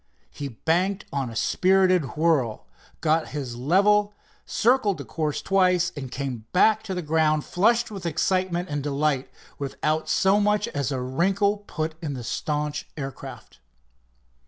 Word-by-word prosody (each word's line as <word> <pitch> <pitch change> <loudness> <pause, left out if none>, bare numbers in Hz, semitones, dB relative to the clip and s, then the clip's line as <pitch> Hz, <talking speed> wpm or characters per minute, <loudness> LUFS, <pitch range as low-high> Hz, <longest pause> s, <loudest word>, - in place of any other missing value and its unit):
He 145 - -5
banked 170 - 0
on 135 -3 -1
a 115 - -9
spirited 185 +2 +2
whirl, 150 -9 +1 0.4
got 160 0 +2
his 130 -4 -4
level, 205 +10 +3 0.3
circled 225 -5 +2
the 140 - -7
course 155 0 -3
twice, 180 -2 +3
and 135 -4 -6
came 130 -5 -4
back 215 +4 +4
to 190 -3 -3
the 180 - -3
ground 155 -1 +1
flushed 230 +5 +2
with 195 -4 -5
excitement 180 +2 0
and 145 -2 -3
delight, 140 -1 0 0.3
without 155 +3 -2
so 195 +2 +3
much 210 +1 +2
as 140 - -2
a 135 - -1
wrinkle 190 - +1
put 155 0 -3
in 145 -4 -3
the 125 - -6
staunch 150 +4 -3
aircraft. 135 - -8
160 Hz, 145 wpm, -25 LUFS, 140-190 Hz, 0.4 s, back